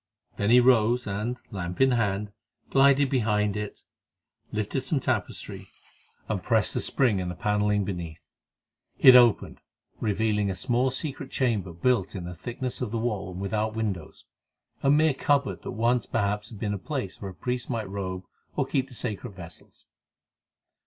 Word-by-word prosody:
Then 100 - 0
he 125 +2 +8
rose 120 -1 +4
and, 110 +5 -3
lamp 90 -3 -5
in 135 0 +5
hand, 105 -3 0 0.4
glided 140 +1 +5
behind 105 -5 +1
it, 105 -1 -5 0.7
lifted 110 +5 -2
some 135 +2 0
tapestry, 120 -7 -3 0.6
and - - -2
pressed - - +1
a - - 0
spring 120 -8 +1
in 90 -1 -3
the 90 - -5
panelling 105 0 +1
beneath. 85 -5 -5 0.8
It 130 -1 +9
opened, 120 -4 +4 0.4
revealing 105 -1 +1
a 95 - -2
small 125 +4 +1
secret 135 0 -5
chamber 110 -10 0
built 100 +3 0
in 90 - -4
the 90 +1 -6
thickness 120 +8 -5
of 125 - -1
the 115 - -2
wall 105 -5 -2
and 90 - -7
without 110 +2 -1
windows; 100 -8 -4 0.6
a 135 - +2
mere 155 +1 +4
cupboard 140 0 +1
that - - -7
once 120 +2 +1
perhaps 105 0 -1
had 110 - -10
been 105 -1 -1
a 100 - -3
place 130 -4 -4
where 100 - -4
a 95 - -11
priest 125 +7 -3
might 115 -3 -2
robe 95 -1 -4 0.3
or - - +1
keep 135 0 -1
the 125 - -12
sacred 105 -4 -5
vessels. 85 -3 -12
110 Hz, 165 wpm, -27 LUFS, 100-125 Hz, 0.8 s, It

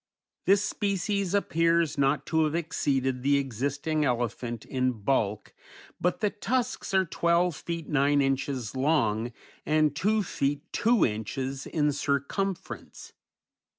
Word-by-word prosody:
This 195 +2 +4
species 200 -1 -1
appears 165 -4 +2
not 140 0 +1
to 160 -1 +2
have 155 +1 -1
exceeded 135 -6 0
the 140 +2 +3
existing 140 +4 -1
elephant 120 -2 -2
in 130 -1 0
bulk, 105 -2 -1 0.5
but 180 +3 0
the 210 -2 +2
tusks 250 +1 -2
are 190 0 +4
twelve 170 0 +1
feet 170 0 -5
nine 145 0 +3
inches 135 -4 -1
long, 125 -5 +1 0.3
and 155 -1 +2
two 210 +5 +2
feet 145 -4 -1
two 235 -4 +3
inches 130 +5 -3
in 150 -2 +1
circumference. 145 +7 -3
145 Hz, 120 wpm, -28 LUFS, 130-170 Hz, 0.5 s, This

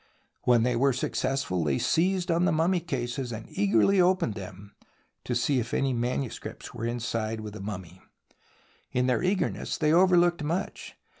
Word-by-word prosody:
When 120 -2 +4
they 125 0 +1
were 135 +3 +3
successful 125 -7 -1
they 70 -3 +1
seized 180 +1 +1
on 170 +2 +2
the - - +3
mummy 165 +4 +2
cases 125 -5 -3
and 110 -1 -6
eagerly 110 - +3
opened 180 - +2
them 100 0 -10 0.5
to - - -2
see 140 -3 +1
if 120 0 -3
any 135 -1 +1
manuscripts 125 +1 -4
were 115 - -4
inside 115 -2 -2
with 105 -1 -7
the 105 - -8
mummy. 95 -4 -7 0.9
In 125 0 +1
their 125 -1 +1
eagerness 185 +2 -1
they 155 0 +2
overlooked 175 -1 +4
much. 170 +6 -3
125 Hz, 160 wpm, -27 LUFS, 110-170 Hz, 0.9 s, When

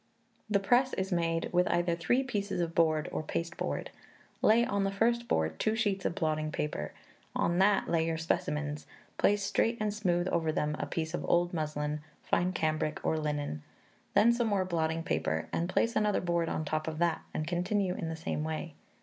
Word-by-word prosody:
The 205 -2 +3
press 245 +6 +3
is 190 +1 -2
made 165 -1 0
with 180 0 +4
either 175 -1 +1
three 245 +10 +1
pieces 205 -7 -2
of 170 -1 -1
board 155 -2 +2
or - - -2
pasteboard. 165 +2 -3 0.5
Lay 230 +2 +5
on 200 -2 0
the 195 - +1
first 235 +4 +1
board 80 0 0
two 220 - +1
sheets 205 -4 0
of - - 0
blotting 155 -3 0
paper; 75 - -3 0.4
on 170 +1 +1
that 195 +1 +4
lay 165 -1 +1
your 165 -1 -1
specimens; 150 -2 -2 0.3
place 205 0 +3
straight 230 +3 +1
and 210 -1 0
smooth 180 -4 +1
over 165 -3 +1
them 150 -1 0
a - - -2
piece 160 -1 -3
of - - -2
old 175 +1 +3
muslin, 150 -2 -2 0.2
fine 180 +1 +1
cambric, 155 -2 -1
or - - +2
linen; 145 - -2 0.5
then 215 +4 +6
some 235 -1 +1
more 200 -3 +1
blotting 165 -2 -1
paper, - - -1
and 170 +2 0
place 230 +5 +1
another 210 -2 +2
board 170 -2 0
on 155 - -1
the 150 - -6
top 155 0 -1
of 160 -1 -3
that, 170 -1 +1
and 155 - -2
continue 180 +3 0
in 175 -4 -4
the 160 - -3
same 160 -1 -3
way. 160 +1 -4
170 Hz, 195 wpm, -31 LUFS, 155-200 Hz, 0.5 s, then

